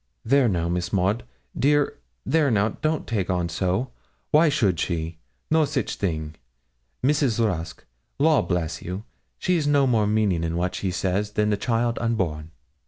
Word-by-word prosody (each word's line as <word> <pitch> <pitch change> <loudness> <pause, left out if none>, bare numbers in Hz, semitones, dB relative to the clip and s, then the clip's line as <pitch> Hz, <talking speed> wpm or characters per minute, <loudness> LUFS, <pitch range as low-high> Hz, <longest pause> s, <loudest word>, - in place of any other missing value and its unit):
'There 135 0 +4
now, 85 -3 0
Miss 85 0 -2
Maud, 100 +4 +1 0.3
dear 145 +1 +2 0.3
there 155 -3 +3
now, 105 -2 +2
don't 155 +4 -2
take 100 -6 -2
on 90 -2 0
so 95 +8 -1 0.4
why 155 +2 +5
should 105 - +1
she? 80 -2 -2 0.3
no 160 0 +5
sich 140 -2 -1
a - - -8
thing. 80 -5 -2 0.7
Mrs. 140 -4 +2
Rusk, 90 -8 -2 0.3
law 155 +1 +4
bless 90 -3 -2
you, 90 +4 -5 0.3
she's 175 -5 +1
no 145 -1 +4
more 115 -5 +2
meaning 105 -6 +1
in 85 0 -2
what 90 +1 -1
she 95 - -2
says 95 +3 -1
than 105 0 +1
the - - +3
child 115 +2 0
unborn.' 90 -10 -1
105 Hz, 165 wpm, -24 LUFS, 90-135 Hz, 0.7 s, why